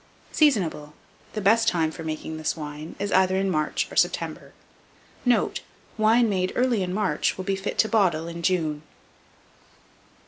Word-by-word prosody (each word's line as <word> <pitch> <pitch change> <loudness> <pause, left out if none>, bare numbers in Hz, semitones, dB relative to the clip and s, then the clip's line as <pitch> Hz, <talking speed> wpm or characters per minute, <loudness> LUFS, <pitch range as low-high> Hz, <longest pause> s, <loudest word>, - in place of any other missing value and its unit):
Seasonable. 180 - +1 0.4
The 215 - -3
best 225 +3 +3
time 165 -5 +2
for 165 - -8
making 160 0 -5
this 155 +1 -2
wine 150 +1 -7
is 200 0 -3
either 190 0 +3
in 195 0 0
March 155 -2 0
or - - -9
September. - - 0 0.7
Note. 245 -1 +2 0.3
Wine 225 +2 +4
made 185 -3 0
early 245 -4 +2
in 180 -1 -2
March 205 +1 0
will 185 - -5
be 195 -1 0
fit 195 +1 -4
to 220 - +4
bottle 180 -8 +1
in 170 0 -6
June. 160 -5 0
185 Hz, 160 wpm, -25 LUFS, 160-215 Hz, 0.7 s, Wine